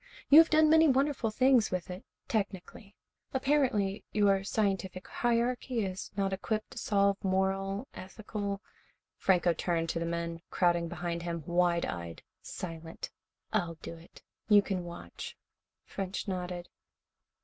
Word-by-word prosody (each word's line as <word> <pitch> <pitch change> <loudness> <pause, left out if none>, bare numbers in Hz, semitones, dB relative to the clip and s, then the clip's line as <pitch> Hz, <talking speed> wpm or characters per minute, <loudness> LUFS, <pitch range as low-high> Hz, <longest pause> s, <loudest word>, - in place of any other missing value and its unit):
You 295 - +10
have 325 - +7
done 310 0 +5
many 320 +1 +6
wonderful 270 -3 +2
things 255 0 +4
with 185 0 -3
it 180 +2 -7 0.2
technically. 200 -1 -4 0.4
Apparently, 260 -8 +1
your 200 -2 +3
scientific 195 -3 -1
hierarchy 240 -1 0
is 185 0 -5
not 195 -1 +1
equipped 215 +3 -2
to - - -7
solve 200 -1 +2
moral, 195 +3 0
ethical 200 0 -5 0.3
" - - -42
Franco 180 -2 +3
turned 165 0 -1
to 165 - -1
the 170 - -2
men, 170 0 -3
crowding 175 -2 +2
behind 170 0 -3
him, 170 -2 -4
wide 175 -1 +2
eyed, 85 -1 -6 0.2
silent. 165 -2 -7 0.4
"I'll 175 -6 0
do - - -6
it. 165 +1 -16 0.3
You 205 -1 +7
can 185 -4 -3
watch." 170 - -8 0.5
French 195 +1 -4
nodded. 180 -2 -4
195 Hz, 140 wpm, -31 LUFS, 175-220 Hz, 0.5 s, You